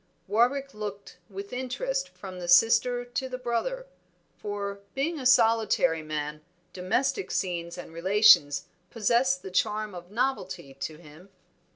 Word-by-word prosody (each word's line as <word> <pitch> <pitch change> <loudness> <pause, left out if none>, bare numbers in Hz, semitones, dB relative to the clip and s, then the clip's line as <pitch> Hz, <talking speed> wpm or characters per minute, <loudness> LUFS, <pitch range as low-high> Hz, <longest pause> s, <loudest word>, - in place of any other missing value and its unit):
Warwick 250 +7 +1
looked 205 -1 -7
with 200 +3 -8
interest - - -2
from 185 -2 -10
the 175 - -6
sister 245 +6 +4
to 245 +2 -4
the 255 - -4
brother; 380 - -2 0.5
for, 200 -1 -5 0.2
being 305 +4 -1
a 255 - +1
solitary 225 -9 +3
man, 150 -1 -4 0.3
domestic 260 - -1
scenes 170 -2 -2
and 175 - -9
relations 170 -6 +5 0.2
possessed 245 +4 +1
the 190 - -7
charm 215 +2 0
of 175 0 -10
novelty 215 - -2
to 150 +3 -6
him. 160 +3 -15
210 Hz, 135 wpm, -27 LUFS, 175-255 Hz, 0.5 s, relations